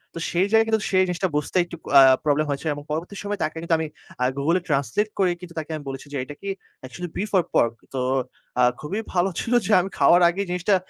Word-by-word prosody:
তো -, -, -4 dB
সেই 180 Hz, +3 st, +3 dB
জায়গায় 225 Hz, 0 st, +6 dB
কিন্তু 220 Hz, -1 st, +1 dB
সেই 185 Hz, 0 st, +4 dB
জিনিসটা 180 Hz, +1 st, -1 dB
বুঝতে 150 Hz, +5 st, -1 dB
একটু 170 Hz, -, -9 dB, 0.2 s
আ -, -, +10 dB, 0.2 s
প্রবলেম 150 Hz, 0 st, +2 dB
হয়েছে 140 Hz, +3 st, -3 dB
এবং 145 Hz, 0 st, -8 dB
পরবর্তী 170 Hz, +6 st, -4 dB
সময়ে 205 Hz, -1 st, -4 dB
তাকে 160 Hz, -, -3 dB
কিন্তু 165 Hz, 0 st, +1 dB
আমি 160 Hz, -, -2 dB, 0.3 s
আ -, -, +3 dB
Google 165 Hz, +6 st, +2 dB
এ -, -, -16 dB
ট্রান্সলেট 150 Hz, -, 0 dB
করেই 180 Hz, -2 st, +2 dB
কিন্তু 170 Hz, -1 st, -10 dB
তাকে 155 Hz, +1 st, -7 dB
আমি 150 Hz, -, -7 dB
বলেছি 135 Hz, +1 st, -7 dB
যে -, -, -2 dB
এটা 145 Hz, +2 st, -9 dB
কি 200 Hz, -, -5 dB, 0.3 s
অ্যাকচুয়ালি 165 Hz, +7 st, -7 dB
বিফ 210 Hz, +2 st, -2 dB
অর 175 Hz, -, +3 dB
পর্ক? 115 Hz, 0 st, +3 dB, 0.2 s
তো 130 Hz, -, -2 dB, 0.6 s
আ -, -, +5 dB, 0.2 s
খুবই 190 Hz, +9 st, -3 dB
ভালো 180 Hz, +2 st, +2 dB
ছিল 240 Hz, -, -2 dB
যে 215 Hz, -, -1 dB
আমি 190 Hz, -, -4 dB
খাওয়ার 170 Hz, +5 st, +5 dB
আগেই 195 Hz, +3 st, -2 dB
জিনিসটা 180 Hz, +3 st, +2 dB
170 Hz, 235 wpm, -23 LUFS, 145-190 Hz, 0.6 s, আ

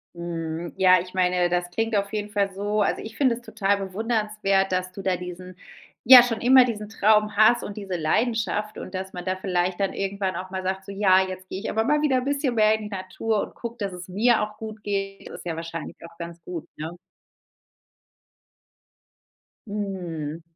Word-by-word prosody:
Mhm, 170 Hz, -1 st, -5 dB
ja, 185 Hz, -1 st, +6 dB
ich 180 Hz, +1 st, -8 dB
meine, 180 Hz, -1 st, +2 dB
das 175 Hz, 0 st, -1 dB
klingt 225 Hz, +4 st, -1 dB
auf 200 Hz, -1 st, 0 dB
jeden 210 Hz, -1 st, -3 dB
Fall 200 Hz, -2 st, +1 dB
so 205 Hz, +2 st, -1 dB
also, 200 Hz, -, 0 dB
ich 220 Hz, 0 st, -9 dB
finde 260 Hz, -3 st, +2 dB
es 240 Hz, -, -11 dB
total 215 Hz, -3 st, 0 dB
bewundernswert, 200 Hz, -1 st, 0 dB
dass 185 Hz, 0 st, -1 dB
du 195 Hz, -, -8 dB
da 185 Hz, -1 st, +1 dB
diesen 180 Hz, +1 st, -8 dB, 0.5 s
ja, 250 Hz, 0 st, +11 dB
schon 230 Hz, -2 st, -2 dB
immer 255 Hz, +1 st, +7 dB
diesen 215 Hz, -3 st, -4 dB
Traum 215 Hz, -1 st, +3 dB
hast 220 Hz, +3 st, +5 dB
und 205 Hz, -, -6 dB
diese 195 Hz, -4 st, -4 dB
Leidenschaft, 215 Hz, +5 st, 0 dB
und 185 Hz, -, -8 dB
dass 190 Hz, 0 st, -4 dB
man 180 Hz, -1 st, -7 dB
da 185 Hz, 0 st, 0 dB
vielleicht 185 Hz, -1 st, -1 dB
dann 195 Hz, -1 st, 0 dB
irgendwann 195 Hz, -1 st, -2 dB
auch 185 Hz, 0 st, -6 dB
mal 190 Hz, 0 st, -4 dB
sagt: 190 Hz, +1 st, -3 dB
„So, 200 Hz, -, -8 dB
ja, 195 Hz, -2 st, +5 dB
jetzt 185 Hz, 0 st, -8 dB
gehe 190 Hz, -, -4 dB
ich 210 Hz, -, -4 dB
aber 220 Hz, -, +1 dB
mal 295 Hz, +5 st, +2 dB
wieder 295 Hz, -3 st, +2 dB
'n 255 Hz, -, -1 dB
bisschen 280 Hz, -3 st, 0 dB
mehr 215 Hz, -1 st, +5 dB
in 220 Hz, -, -6 dB
die 210 Hz, -, -6 dB
Natur 205 Hz, +2 st, -2 dB
und -, -, -9 dB
gucke, 235 Hz, 0 st, -7 dB
dass 200 Hz, -2 st, -3 dB
es 180 Hz, 0 st, -8 dB
mir 220 Hz, +6 st, +3 dB
auch 210 Hz, 0 st, -4 dB
gut 220 Hz, 0 st, -8 dB
geht.“ 195 Hz, -1 st, -3 dB
Das -, -, -9 dB
ist -, -, -16 dB
ja 170 Hz, -2 st, -2 dB
wahrscheinlich 165 Hz, -1 st, -6 dB
auch 170 Hz, 0 st, -12 dB
ganz 170 Hz, 0 st, -8 dB
gut, 170 Hz, -1 st, -6 dB
ne? 155 Hz, +1 st, -4 dB, 2.8 s
Mhm. 175 Hz, -7 st, -4 dB
195 Hz, 205 wpm, -25 LUFS, 180-215 Hz, 2.8 s, ja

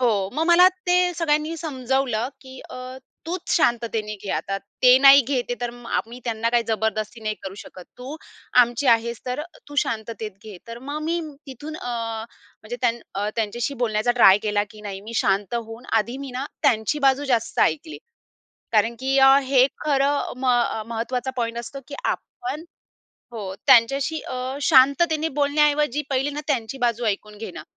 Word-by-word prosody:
हो, 210 Hz, -6 st, +1 dB
मग 315 Hz, -, 0 dB
मला 350 Hz, +1 st, +7 dB, 0.2 s
ते 360 Hz, 0 st, +3 dB
सगळ्यांनी 315 Hz, -1 st, 0 dB
समजावलं 265 Hz, -6 st, -1 dB
की 260 Hz, -2 st, -12 dB
अ, -, -, -8 dB, 0.5 s
"तूच 360 Hz, +2 st, -3 dB
शांततेने 230 Hz, -7 st, 0 dB
घेआता, 195 Hz, 0 st, -2 dB, 0.3 s
ते 250 Hz, 0 st, +8 dB
नाही 275 Hz, +1 st, +9 dB
घेत 265 Hz, -2 st, 0 dB
आहे 245 Hz, -, -1 dB
तर 240 Hz, -1 st, -2 dB
म 240 Hz, 0 st, -13 dB
आम्ही 230 Hz, +1 st, -3 dB
त्यांना 230 Hz, -1 st, -1 dB
काही 240 Hz, 0 st, +3 dB
जबरदस्ती 220 Hz, +1 st, -2 dB
नाही 215 Hz, 0 st, -2 dB
करू 195 Hz, 0 st, -6 dB
शकत. 185 Hz, -2 st, -11 dB
तू 260 Hz, +5 st, -7 dB, 0.5 s
आमची 240 Hz, +3 st, -2 dB
आहेस, 235 Hz, 0 st, +2 dB
तर 250 Hz, +2 st, -2 dB
अ, -, -, -5 dB, 0.2 s
तू 290 Hz, -, -10 dB
शांततेत 220 Hz, -2 st, -2 dB
घे." 215 Hz, -3 st, -9 dB
तर 230 Hz, 0 st, -7 dB
मग 285 Hz, +4 st, -5 dB
मी 335 Hz, +2 st, -1 dB, 0.3 s
तिथून 290 Hz, +4 st, -8 dB
अ, 245 Hz, -, -6 dB, 0.7 s
म्हणजे 230 Hz, +3 st, -6 dB
त्यां 245 Hz, -2 st, +3 dB, 0.2 s
अ, 200 Hz, +2 st, -1 dB
त्यांच्याशी 230 Hz, +4 st, -2 dB
बोलण्याचा 215 Hz, +1 st, 0 dB
ट्राय 195 Hz, -2 st, +8 dB
केला, 205 Hz, -1 st, +1 dB
की 215 Hz, -, -13 dB
नाही 200 Hz, -2 st, -6 dB
मी 220 Hz, +3 st, -9 dB
शांत 200 Hz, +2 st, +1 dB
होऊन 230 Hz, 0 st, -5 dB, 0.2 s
आधी 235 Hz, +4 st, -5 dB
मी 275 Hz, -1 st, -7 dB
ना 255 Hz, +2 st, -4 dB, 0.2 s
त्यांची 220 Hz, +6 st, +2 dB
बाजू 270 Hz, +2 st, +3 dB
जास्त 225 Hz, -1 st, -2 dB
ऐकली 315 Hz, +1 st, 0 dB, 0.7 s
कारण 225 Hz, +1 st, +3 dB
की 265 Hz, +1 st, 0 dB
अ, 270 Hz, 0 st, +7 dB
हे 260 Hz, -1 st, +4 dB, 0.2 s
खरं 285 Hz, -1 st, +1 dB
म 260 Hz, -, -2 dB
अ, 240 Hz, -3 st, +2 dB
महत्त्वाचा 240 Hz, +3 st, -3 dB
पॉइंट 235 Hz, -1 st, -2 dB
असतो 240 Hz, +4 st, -7 dB
की 285 Hz, -, -7 dB
आपण 370 Hz, -4 st, -4 dB, 0.7 s
हो. 205 Hz, -5 st, -6 dB
त्यांच्याशी 275 Hz, +5 st, +4 dB
अ, 255 Hz, +2 st, -5 dB
शांततेने 310 Hz, +3 st, +4 dB
बोलण्याऐवजी 295 Hz, -1 st, +2 dB
पहिले 270 Hz, +1 st, 0 dB
ना 295 Hz, +1 st, -5 dB
त्यांची 260 Hz, -3 st, -1 dB
बाजू 240 Hz, -2 st, 0 dB
ऐकून 210 Hz, 0 st, -3 dB
घेणं 205 Hz, -7 st, -8 dB
245 Hz, 170 wpm, -23 LUFS, 225-280 Hz, 0.7 s, नाही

